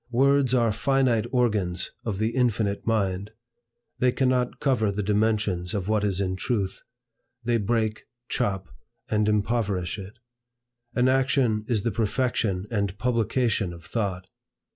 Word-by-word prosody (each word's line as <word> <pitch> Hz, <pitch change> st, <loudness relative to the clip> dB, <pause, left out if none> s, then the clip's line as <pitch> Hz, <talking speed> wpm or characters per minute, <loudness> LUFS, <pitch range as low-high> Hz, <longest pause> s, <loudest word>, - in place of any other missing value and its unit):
Words 135 Hz, +1 st, +3 dB
are 115 Hz, -3 st, +3 dB
finite 120 Hz, +1 st, +2 dB
organs 105 Hz, -8 st, +1 dB
of 105 Hz, -4 st, -2 dB
the 110 Hz, +2 st, +1 dB
infinite 115 Hz, -6 st, 0 dB
mind. 100 Hz, -3 st, 0 dB, 0.7 s
They 125 Hz, 0 st, +4 dB
cannot 125 Hz, -1 st, +1 dB
cover 125 Hz, -7 st, +2 dB
the 105 Hz, +1 st, -2 dB
dimensions 105 Hz, -3 st, 0 dB
of 95 Hz, -2 st, -2 dB
what 110 Hz, -1 st, +1 dB
is 100 Hz, -2 st, +1 dB
in 95 Hz, -1 st, -1 dB
truth. 100 Hz, -3 st, -2 dB, 0.6 s
They 120 Hz, 0 st, +2 dB
break, 110 Hz, 0 st, -1 dB, 0.2 s
chop, 95 Hz, -4 st, -1 dB, 0.4 s
and 105 Hz, -1 st, +2 dB
impoverish 105 Hz, -4 st, 0 dB
it. 100 Hz, +4 st, -10 dB, 0.8 s
An 125 Hz, 0 st, +3 dB
action 130 Hz, -5 st, +2 dB
is 110 Hz, -5 st, 0 dB
the 115 Hz, -, 0 dB
perfection 110 Hz, -3 st, 0 dB
and 100 Hz, -3 st, -1 dB
publication 115 Hz, -4 st, +1 dB
of 85 Hz, -1 st, -12 dB
thought. 95 Hz, -2 st, -2 dB
110 Hz, 135 wpm, -26 LUFS, 100-120 Hz, 0.8 s, They